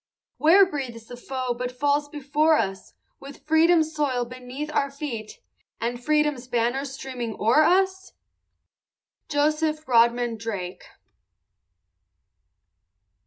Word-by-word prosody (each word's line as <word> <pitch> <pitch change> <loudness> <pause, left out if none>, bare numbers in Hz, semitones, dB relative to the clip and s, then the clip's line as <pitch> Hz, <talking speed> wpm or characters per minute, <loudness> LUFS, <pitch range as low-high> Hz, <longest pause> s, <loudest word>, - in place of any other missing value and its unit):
Where 360 +6 +6
breathes 260 -9 -6
the 245 - -9
foe 255 0 -3
but 250 +1 -4
falls 290 +3 0
before 300 +2 +2
us, 195 -3 -4 0.2
With 275 0 -12
Freedom's 320 0 +3
soil 270 -5 0
beneath 255 +4 -7
our 280 - +1
feet, 265 -7 -7 0.4
And 240 +1 -3
Freedom's 300 -4 +1
banner 240 +3 0
streaming 255 -5 -6
o'er 230 +8 +4
us? 380 +3 +2 1.2
JOSEPH 305 +1 0
RODMAN 235 -1 +3
DRAKE. 200 -5 -6
270 Hz, 105 wpm, -24 LUFS, 240-305 Hz, 1.2 s, Where